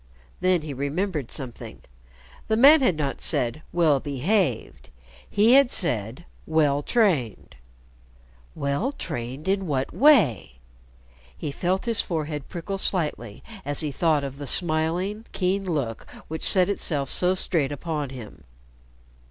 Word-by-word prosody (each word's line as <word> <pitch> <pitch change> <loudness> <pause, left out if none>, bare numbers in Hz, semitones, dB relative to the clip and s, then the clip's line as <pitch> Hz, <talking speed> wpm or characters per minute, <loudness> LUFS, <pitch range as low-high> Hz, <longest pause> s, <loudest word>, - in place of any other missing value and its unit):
Then 185 -3 +2
he 150 -2 -5
remembered 145 - -3
something. 130 -6 -7 0.6
The 220 - +1
man 285 +5 +7
had 190 -10 +2
not 140 -3 -3
said 120 +5 0
"well 160 -5 +3
behaved," 145 - -1 0.4
he 215 +4 +4
had 275 -2 +6
said 125 - -2 0.2
"well 150 -3 +2
trained." 160 - 0 1.0
Well 140 - -1
trained 125 - -6
in 195 -1 0
what 135 -3 -2
way? 220 - +4 0.8
He 140 - -4
felt 185 +7 -1
his 230 -3 +2
forehead 155 -4 -4
prickle 195 +3 -5
slightly 150 - -2 0.2
as 145 0 -2
he 150 -2 -2
thought 155 0 +1
of 140 0 -6
the 145 - -6
smiling, 175 - 0
keen 195 +1 -1
look 140 -11 -3 0.2
which 160 +1 +1
set 185 -2 +5
itself 145 -8 -1
so 180 +1 +3
straight 160 -6 -1
upon 150 -1 -4
him. 120 - -11
155 Hz, 130 wpm, -24 LUFS, 140-190 Hz, 1.0 s, man